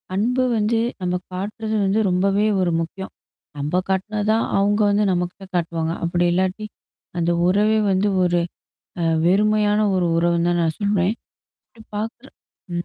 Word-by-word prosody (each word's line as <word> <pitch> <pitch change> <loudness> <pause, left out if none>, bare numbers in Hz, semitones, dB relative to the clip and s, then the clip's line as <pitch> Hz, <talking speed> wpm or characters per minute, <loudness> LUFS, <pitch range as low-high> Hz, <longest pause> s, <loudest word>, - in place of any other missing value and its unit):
அன்பு 245 +6 +1
வந்து 215 +2 +1 0.2
நம்ம 180 0 -1 0.2
காட்டுறது 215 +4 -4
வந்து 195 +3 +1
ரொம்பவே 195 +3 +2 0.2
ஒரு 180 -2 +1
முக்கியம். 190 +3 -6 0.5
நம்ப 145 +4 -2
காட்டுனதான் 210 +3 0 0.2
அங்க 205 +1 +2
வந்து 205 +1 +2
நம்மகிட்ட 180 +2 -3
காட்டுவாங்க. 165 -1 -1
அப்பிடி 175 +1 +1
இல்லாட்டி, 190 +4 -1 0.5
அந்த 170 0 +1 0.2
உறவே 210 +4 +3
வந்து 190 +2 +2 0.2
ஒரு 175 -1 +2 0.6
அ - - +1 0.2
வெறுமையான 210 +2 +3
ஒரு 180 -2 +1
உறவுன்னு 170 0 +2
தான் 175 0 +1
நான் 160 -1 -1
சொல்றேன். 200 -2 +1 0.6
அப்பிடி 230 -3 -17
பாக்குற 225 +5 -5 0.5
ம். 175 0 -2
190 Hz, 140 wpm, -21 LUFS, 175-210 Hz, 0.6 s, உறவே